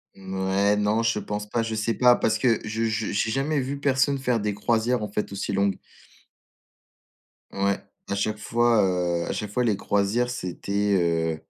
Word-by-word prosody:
Mouais, 95 +1 0
non, 105 +2 +1
je 115 -2 +1
pense 105 +1 -4
pas. 115 0 0
Je 115 0 -3
sais 110 +1 0
pas 125 -1 +5
parce 110 0 +1
que 115 0 +2
je 110 +2 -2
je 110 -1 -1
je - - -3
j'ai 110 +2 0
jamais 140 +3 0
vu 140 +2 -4
personne 140 0 +2
faire 125 -4 0
des 105 -1 -1
croisières, 115 +2 0
en - - -2
fait, 105 0 -3
aussi 100 0 -3
longues 100 0 +1 1.8
ouais, 100 0 0 0.3
à 100 - -1
chaque 105 +2 -1
fois, 120 0 +2
heu, 90 -2 0
à - - -2
chaque 105 -2 -4
fois 125 +3 0
les 110 -4 +2
croisières, 105 +5 0
c'était 100 -2 -1
heu 80 -2 0
105 Hz, 190 wpm, -25 LUFS, 100-120 Hz, 1.8 s, pas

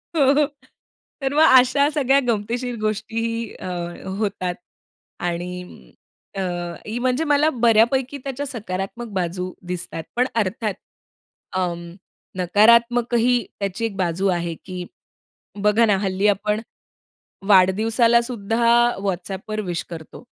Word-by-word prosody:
हो, 285 0 +4 0.8
तर 270 0 -1
मग 305 +2 +5 0.2
अशा 280 +3 +3
सगळ्या 275 -2 +3
गमतीशीर 235 +3 -1
गोष्टीही 230 +1 -2
अ, - - -9 0.5
होतात. 190 -4 -2 0.6
आणि 175 - -5 0.4
अ, - - -1 0.6
म्हणजे 255 +4 +1
मला 295 0 +3
बऱ्यापैकी 240 +2 +2
त्याच्या 275 +1 -4
सकारात्मक 220 -2 -5
बाजू 180 0 -2 0.2
दिसतात. 175 -2 -4
पण 250 - +3
अर्थात 215 -1 -1 0.8
अ, 185 -1 +1 0.7
नकारात्मकही 235 +5 +3
त्याची 200 +3 -2
1 215 -4 -4
बाजू 185 +1 0
आहे, 170 -2 -1
की 180 -1 -6 0.8
बघा 210 +2 +4
ना 205 -3 +3
हल्ली 195 +1 +1
आपण 210 +1 +1 0.9
वाढदिवसालासुद्धा 225 +3 +3 0.4
WhatsAppवर 195 +3 -3
विश 175 -1 -2
करतो. 165 +6 -9
215 Hz, 105 wpm, -22 LUFS, 185-245 Hz, 0.9 s, मग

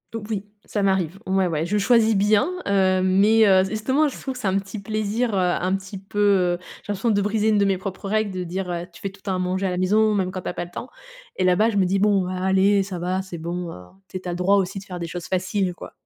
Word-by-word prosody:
Heu, 225 - -3
oui, 205 -2 -3 0.2
ça 205 - -2
m'arrive, 190 -2 0
ouais, 190 0 +2
ouais. 160 -2 -1
Je 205 +5 0
choisis 225 +1 +4
bien, 205 - +3 0.2
heu, 190 -2 +2
mais, 200 +4 +4
heu, 190 -2 +5
justement 260 +9 +1
je 280 - -6
trouve 265 - -4
que - - -7
c'est 215 - -2
un 190 +1 +2
petit 195 +2 -5
plaisir, 215 +3 -1
heu, - - +1
un 180 +1 +1
petit 195 +1 -7
peu, 195 +2 -6
heu, 190 -4 +3 0.3
j'ai 205 - -3
l'impression 205 +4 -1
de 205 -1 +2
briser 210 +1 +1
une 215 - +3
de 200 - +3
mes 195 -1 +1
propres 190 +1 -6
règles 215 0 0
de 185 -1 -4
dire, 180 +2 -4
heu: 175 0 -3
«Tu 170 - -14
fais 195 - -3
tout 195 +1 -17
le - - -30
temps 195 -2 -1
à - - -2
manger 185 +1 -1
à - - 0
la 180 - -2
maison 210 +4 +3
même 185 -2 0
quand 185 -1 -5
tu - - -4
as - - -4
pas 175 - -4
le 175 - -15
temps» 245 +8 -7 0.5
et 185 - -1
là-bas 185 +5 +4
je 205 - -2
me 195 - +4
dis: 195 +2 +1
«Bon 200 -2 +3
allez, 190 +2 +2
ça 190 -2 -6
va, 180 +2 -1
c'est 190 -2 -8
bon, 170 +2 -4
heu, 90 - -10 0.2
tu 185 - -6
es - - -5
tu 180 - -6
as - - -1
le 175 - -3
droit 185 +3 +3
aussi 195 0 0
de 195 - -13
faire 180 -2 -7
des 170 - -4
choses 175 +1 -6
faciles 185 0 -1
quoi». - - -10
195 Hz, 295 wpm, -23 LUFS, 185-205 Hz, 0.5 s, heu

